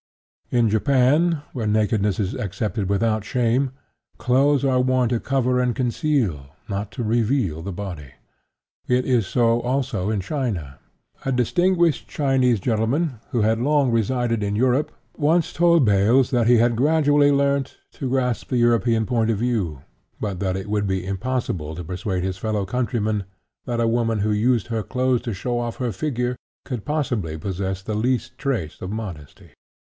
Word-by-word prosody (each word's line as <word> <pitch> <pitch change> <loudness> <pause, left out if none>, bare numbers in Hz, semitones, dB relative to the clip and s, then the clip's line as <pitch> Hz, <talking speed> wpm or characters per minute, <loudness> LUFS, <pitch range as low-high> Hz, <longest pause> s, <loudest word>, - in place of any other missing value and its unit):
In 120 -2 +3
Japan, 140 +8 +2
where 115 -5 -2
nakedness 105 -1 +1
is 100 -2 -1
accepted 100 0 -3
without 110 +1 +1
shame, 125 +3 +1 0.5
clothes 140 +2 +2
are 130 -2 +3
worn 130 -1 +2
to 120 -1 0
cover 130 -1 +1
and 125 -1 +1
conceal, 130 - 0
and 70 0 -16 0.2
not 100 0 -3
to 120 - -4
reveal, 110 - 0
the 100 +4 -5
body. 85 -8 -7 0.7
It 125 0 +2
is 120 -7 +2
so, 120 0 +2
also, 120 -6 -1
in 110 -2 0
China. 95 - -3 0.4
A 135 - -1
distinguished 170 +5 +2
Chinese 130 -5 +2
gentleman, 120 - 0
who 120 - 0
had 110 +1 +2
long 140 -1 +2
resided 115 0 0
in 100 0 -1
Europe, 130 +5 +1 0.3
once 165 +2 +2
told 170 -4 +4
Baelz 110 +6 +3
that 120 -3 +2
he 120 0 +6
had 120 +1 +3
gradually 145 +1 +3
learnt 140 -1 +1
to 135 - -5
grasp 125 -3 0
the 125 - 0
European 115 -1 +2
point 115 -2 +1
of 110 - +1
view, 100 - -1 0.4
but 100 -4 -3
that 95 -1 -1
it 95 - -6
would 105 -1 0
be 95 -1 -1
impossible 95 -6 -3
to 90 - -6
persuade 90 +2 -3
his 95 0 -3
fellow 105 -2 -1
countrymen 110 -2 -1 0.4
that 120 -2 -2
a 115 - +2
woman 115 -2 +1
who 105 +1 +1
used 110 0 +2
her 115 -1 -1
clothes 130 +2 0
to 120 -3 -4
show 120 +5 -2
off 120 -1 -3
her 125 -2 -2
figure 125 -3 -2 0.3
could 125 -6 -5
possibly 120 - -2
possess 95 +2 -3
the 110 - -4
least 120 +2 -1
trace 115 - -3
of 95 - -5
modesty. 95 -9 -7
115 Hz, 165 wpm, -22 LUFS, 105-130 Hz, 0.7 s, he